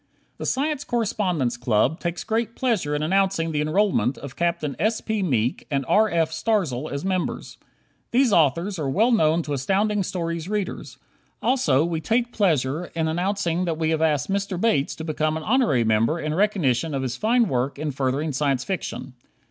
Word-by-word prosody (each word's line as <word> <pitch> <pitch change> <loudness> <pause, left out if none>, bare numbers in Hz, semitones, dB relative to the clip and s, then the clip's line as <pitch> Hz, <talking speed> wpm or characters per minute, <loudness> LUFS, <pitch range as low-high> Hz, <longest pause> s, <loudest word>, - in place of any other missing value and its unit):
The - - -3
Science 290 +1 0
Correspondence 185 - -1
Club 120 +6 +1
takes 170 0 -3
great 225 +1 -1
pleasure 210 - 0
in 150 - -1
announcing 190 -1 +1
the 150 -1 0
enrollment 155 - +1
of 140 -3 -9
Capt. 170 -2 0
S. 220 +1 +1
P. 220 -2 -2
Meek 125 - 0
and 140 -3 -1
R. 220 +1 +4
F. 165 -3 +1
Starzl 160 - -1
as 140 +4 -4
members. 185 -2 -3 0.5
These 245 -2 +3
authors 170 +5 +2
are 140 -3 -1
well 220 - +3
known 165 -6 +3
to 145 - -4
Astounding 200 +9 +1
Stories 170 -2 -3
readers. 210 -2 -4 0.4
Also, 160 - +2
we 165 -2 -2
take 235 +5 0
pleasure 160 - +1
in 160 -1 0
announcing 175 +1 -1
that 165 -2 -2
we 160 0 0
have 160 -1 0
asked 155 +1 +1
Mr. 195 -2 -1
Bates 210 -10 +1
to 160 - -7
become 155 0 -1
an 160 - -6
honorary 225 - +2
member 115 +8 +2
in 155 -1 -2
recognition 160 - +1
of 135 - -2
his 125 -2 -2
fine 230 - +2
work 130 -1 -1
in 150 0 -2
furthering 135 +3 -1
Science 135 -2 0
Fiction. 165 -7 -4
165 Hz, 180 wpm, -24 LUFS, 145-200 Hz, 0.5 s, R